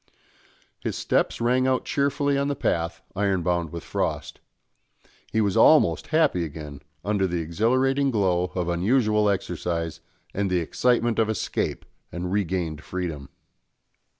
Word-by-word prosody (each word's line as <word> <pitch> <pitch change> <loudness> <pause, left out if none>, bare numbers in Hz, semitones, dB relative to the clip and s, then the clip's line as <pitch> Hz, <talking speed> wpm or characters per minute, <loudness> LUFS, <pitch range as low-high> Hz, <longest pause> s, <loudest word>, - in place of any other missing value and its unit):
His - - -3
steps - - 0
rang 125 +2 +2
out 130 -1 +1
cheerfully 140 0 +1
on 140 0 +1
the 145 - -1
path 85 -7 -1
ironbound 90 -4 0
with 85 -2 -6
frost. - - -3 0.9
He 110 - +2
was 100 -1 +1
almost 150 +7 +5
happy 155 - +2
again 75 -2 -7 0.2
under 100 -2 +1
the 85 -1 -2
exhilarating 130 - +1
glow 95 -7 +1
of 90 -2 -1
unusual 105 +4 +2
exercise 85 -4 -2 0.3
and 100 0 -1
the 90 - +1
excitement 120 +7 +1
of 110 -1 +2
escape 110 - -2 0.3
and 90 +1 -4
regained 90 -6 -1
freedom. 85 -7 -5
95 Hz, 130 wpm, -25 LUFS, 85-120 Hz, 0.9 s, almost